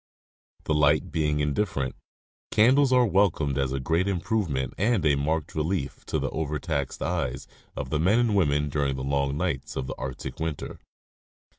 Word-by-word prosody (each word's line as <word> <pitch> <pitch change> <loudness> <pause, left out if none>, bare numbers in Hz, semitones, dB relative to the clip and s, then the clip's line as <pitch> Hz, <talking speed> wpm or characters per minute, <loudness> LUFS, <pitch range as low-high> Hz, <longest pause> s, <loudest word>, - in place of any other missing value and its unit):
The 75 - 0
light 75 0 +3
being 75 -2 0
indifferent, 75 -3 -1 0.5
candles 130 +5 +4
are 125 -1 +5
welcomed 85 - +2
as 65 -1 0
a 70 - -1
great 80 +8 +1
improvement 85 - -1
and 105 -3 +1
a 75 - +5
marked 75 +3 -1
relief 80 -1 -2
to - - 0
the - - -2
over 75 -1 -2
taxed 70 -5 -3
eyes 80 -8 -2 0.3
of - - -5
the 75 - +1
men 95 +8 +3
and 120 -3 +2
women 75 -6 +2
during 70 -1 0
the 65 - -4
long 70 0 0
nights 80 -6 -2
of 65 - -2
the - - -4
Arctic 65 +1 -6
winter. 80 -3 -4
75 Hz, 170 wpm, -26 LUFS, 70-95 Hz, 0.5 s, are